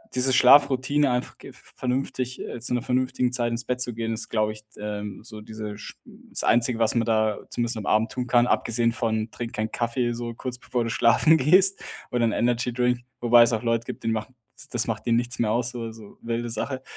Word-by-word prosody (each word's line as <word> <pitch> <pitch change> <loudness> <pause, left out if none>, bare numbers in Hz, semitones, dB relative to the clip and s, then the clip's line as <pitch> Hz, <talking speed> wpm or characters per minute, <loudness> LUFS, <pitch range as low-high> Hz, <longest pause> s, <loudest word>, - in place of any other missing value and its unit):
diese 130 +1 +2
Schlafroutine, 140 +2 +5
einfach 125 0 -3
gef - - -15
vernünftig 130 0 -3
äh, 120 - -6
zu 120 - -3
'ner 125 - 0
vernünftigen 125 0 0
Zeit 120 -1 0
ins 115 +1 -2
Bett 125 0 -2
zu 120 -1 -1
gehen, 115 0 -3
ist, 110 - -3
glaube 110 -1 +1
ich, 110 0 -13
ähm, 105 -1 -6
so 110 -2 -10
diese 105 -1 -7
sch - - -10
das - - -6
Einzige, 120 0 +2
was 115 0 +2
man 115 -1 +2
da 110 -2 +1
zumindest 120 0 -2
am 105 - -6
Abend 110 +1 +2
tun 125 -1 -4
kann, 120 0 +4
abgesehen 115 -1 +1
von 110 -1 -2
trink 115 +1 -6
keinen 110 +1 -3
Kaffee, 120 +1 -1
so 120 0 -5
kurz 125 +1 -5
bevor 125 -1 -2
du - - -2
schlafen 125 +7 +4
gehst 185 +7 +4 0.3
oder 120 -1 +1
'n 115 - +1
Energydrink, 125 +1 0 0.2
wobei 120 0 +7
es 115 - +1
auch 110 +1 -1
Leute 115 0 0
gibt, - - -7
denen 115 0 0
macht 110 +1 -3
ds 130 - -28 0.3
das 120 -2 0
macht 115 +1 -4
denen 115 0 +3
nichts 120 +2 -3
mehr 110 -2 +1
aus, 120 +2 0
so, 120 -1 -6
also 110 -2 -9
wilde 115 0 -3
Sache. 130 +3 -4
120 Hz, 225 wpm, -25 LUFS, 115-125 Hz, 0.3 s, wobei